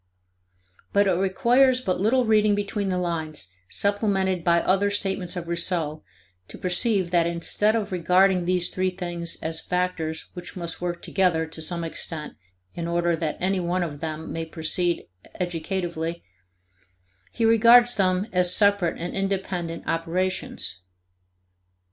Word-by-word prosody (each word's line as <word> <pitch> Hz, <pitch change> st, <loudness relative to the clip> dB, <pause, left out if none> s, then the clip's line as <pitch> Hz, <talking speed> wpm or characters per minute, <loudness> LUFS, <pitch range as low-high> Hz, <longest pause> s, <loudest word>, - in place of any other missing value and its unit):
But 200 Hz, 0 st, +4 dB
it 195 Hz, -, +3 dB
requires 240 Hz, +8 st, +3 dB
but 185 Hz, -8 st, -2 dB
little 245 Hz, +5 st, +3 dB
reading 215 Hz, -2 st, +4 dB
between 205 Hz, 0 st, -2 dB
the 185 Hz, -, 0 dB
lines, 160 Hz, -, -2 dB, 0.2 s
supplemented 195 Hz, -3 st, +1 dB
by 170 Hz, 0 st, +4 dB
other 195 Hz, +2 st, +2 dB
statements 190 Hz, -3 st, -2 dB
of 175 Hz, -2 st, -5 dB
Rousseau, 170 Hz, -3 st, -1 dB, 0.5 s
to -, -, -10 dB
perceive 185 Hz, 0 st, +1 dB
that 170 Hz, -2 st, +3 dB
instead 170 Hz, +6 st, +1 dB
of 215 Hz, -2 st, -2 dB
regarding 180 Hz, +1 st, +3 dB
these 180 Hz, 0 st, +1 dB
three 185 Hz, 0 st, 0 dB
things 175 Hz, -2 st, -4 dB
as 160 Hz, 0 st, -2 dB
factors 180 Hz, -3 st, -2 dB
which 180 Hz, 0 st, -8 dB
must 170 Hz, -1 st, -5 dB
work 175 Hz, -1 st, -3 dB
together 180 Hz, -4 st, +1 dB
to 160 Hz, 0 st, -9 dB
some 170 Hz, +1 st, -2 dB
extent 160 Hz, -1 st, -5 dB, 0.4 s
in 170 Hz, -1 st, -4 dB
order 170 Hz, 0 st, +1 dB
that 160 Hz, -2 st, -3 dB
any 190 Hz, +1 st, 0 dB
one 175 Hz, +1 st, 0 dB
of 150 Hz, -4 st, -5 dB
them 160 Hz, 0 st, -5 dB
may 165 Hz, -, -3 dB
proceed 165 Hz, +2 st, -1 dB, 0.3 s
educatively, 170 Hz, -1 st, -3 dB, 1.1 s
he 230 Hz, -, 0 dB
regards 235 Hz, +2 st, +6 dB
them 185 Hz, -1 st, +1 dB
as 180 Hz, -1 st, +3 dB
separate 200 Hz, -4 st, +3 dB
and 175 Hz, +1 st, -4 dB
independent 190 Hz, -4 st, -3 dB
operations. 165 Hz, -, -2 dB
180 Hz, 140 wpm, -25 LUFS, 170-195 Hz, 1.1 s, regards